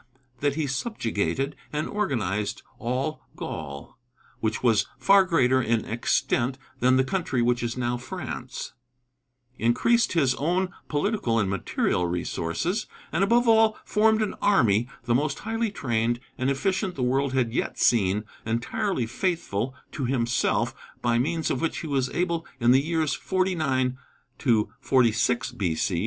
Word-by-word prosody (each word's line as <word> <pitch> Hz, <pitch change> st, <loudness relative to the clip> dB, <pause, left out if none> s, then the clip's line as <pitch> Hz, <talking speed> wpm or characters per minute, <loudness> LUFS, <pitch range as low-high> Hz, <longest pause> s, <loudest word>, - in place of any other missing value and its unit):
that 145 Hz, -1 st, +1 dB
he 155 Hz, -1 st, 0 dB
subjugated 135 Hz, -, -2 dB, 0.2 s
and 150 Hz, +1 st, -2 dB
organized 105 Hz, -, -1 dB, 0.2 s
"All 130 Hz, +6 st, -2 dB
Gaul," 70 Hz, +6 st, -7 dB, 0.4 s
which 110 Hz, +1 st, -2 dB
was 115 Hz, -4 st, +3 dB
far 195 Hz, -1 st, +5 dB
greater 130 Hz, -7 st, +3 dB
in 115 Hz, -2 st, 0 dB
extent 120 Hz, +2 st, 0 dB, 0.2 s
than 130 Hz, +1 st, +4 dB
the 130 Hz, -, +4 dB
country 140 Hz, -6 st, -1 dB
which 120 Hz, 0 st, +2 dB
is 120 Hz, +1 st, -3 dB
now 120 Hz, 0 st, 0 dB
France; 130 Hz, -3 st, -6 dB, 0.9 s
increased 230 Hz, -, +3 dB
his 140 Hz, -7 st, +3 dB
own 180 Hz, +5 st, 0 dB, 0.2 s
political 150 Hz, -, 0 dB
and 100 Hz, -4 st, +1 dB
material 90 Hz, -1 st, 0 dB
resources; 90 Hz, -, -2 dB, 0.2 s
and -, -, +1 dB
above 235 Hz, +4 st, +3 dB
all 225 Hz, -1 st, +5 dB
formed 220 Hz, +1 st, +3 dB
an 210 Hz, -, -2 dB
army, 115 Hz, -, +3 dB
the 120 Hz, 0 st, +1 dB
most 145 Hz, +3 st, +1 dB
highly 225 Hz, +1 st, -1 dB
trained 120 Hz, -, 0 dB, 0.2 s
and 130 Hz, +1 st, 0 dB
efficient 190 Hz, +7 st, 0 dB
the 130 Hz, -, -2 dB
world 135 Hz, +2 st, +1 dB
had 125 Hz, -3 st, +1 dB
yet -, -, -1 dB
seen, 105 Hz, -3 st, +3 dB, 0.2 s
entirely 120 Hz, -, -1 dB
faithful 130 Hz, -, -2 dB, 0.2 s
to 140 Hz, -, -3 dB
himself, 120 Hz, -1 st, +1 dB, 0.3 s
by 120 Hz, -1 st, +2 dB
means 160 Hz, +5 st, 0 dB
of 130 Hz, -, -1 dB
which 165 Hz, -, -1 dB
he 160 Hz, -, -5 dB
was 135 Hz, -3 st, 0 dB
able 170 Hz, -2 st, -1 dB, 0.2 s
in 120 Hz, 0 st, +4 dB
the 130 Hz, +2 st, +6 dB
years 160 Hz, 0 st, 0 dB
49 155 Hz, -9 st, 0 dB, 0.8 s
46 125 Hz, -2 st, +2 dB
B.C. 85 Hz, -2 st, -1 dB
130 Hz, 140 wpm, -26 LUFS, 120-170 Hz, 0.9 s, the